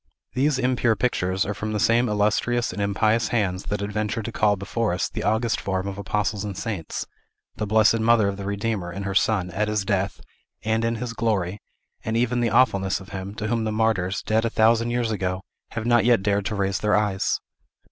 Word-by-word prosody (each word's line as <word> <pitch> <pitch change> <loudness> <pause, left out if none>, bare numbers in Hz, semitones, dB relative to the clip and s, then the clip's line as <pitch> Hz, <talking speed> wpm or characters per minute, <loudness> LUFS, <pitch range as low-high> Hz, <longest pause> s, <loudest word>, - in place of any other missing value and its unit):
These 140 +2 +2
impure 125 -3 +2
pictures 95 -5 0
are 105 - -2
from 110 +2 -4
the 105 - -1
same 120 +4 +3
illustrious 105 +3 +1
and 105 - -4
impious 110 +3 +2
hands 100 -5 -1
that 105 0 -2
adventured 105 +2 -2
to 115 - -4
call 105 -2 +2
before 100 +1 -1
us 90 - -1
the - - -5
august 110 +2 +1
forms 95 0 -2
of 100 0 -7
Apostles 105 0 -1
and 100 -3 -5
Saints, 100 -8 -4 0.5
the 105 - -2
Blessed 110 +2 +4
Mother 110 -2 +4
of 100 - -1
the 100 - -7
Redeemer, 100 -2 -2
and 95 +3 -5
her 100 - -2
Son, 95 -3 +1
at 105 +4 -1
his 105 -2 -1
death, 100 -1 -1 0.4
and 110 +1 +1
in 115 0 0
his 115 +1 -4
glory, 105 -4 -1 0.4
and 110 +1 -1
even 120 +1 +1
the 120 - +2
awfulness 105 -5 +2
of 95 - -12
Him, 95 +1 -6
to 105 - -4
whom 115 +1 0
the 110 - -1
martyrs, 110 -3 0
dead 110 +1 +1
a 115 - +1
thousand 115 +1 +3
years 120 -1 0
ago, 95 -2 -2 0.3
have 115 -1 -3
not 120 -1 +4
yet 120 -4 +3
dared 100 -1 +1
to 110 - -2
raise 100 -1 0
their 105 -1 +2
eyes. 105 -2 +1
105 Hz, 210 wpm, -24 LUFS, 100-115 Hz, 0.5 s, Blessed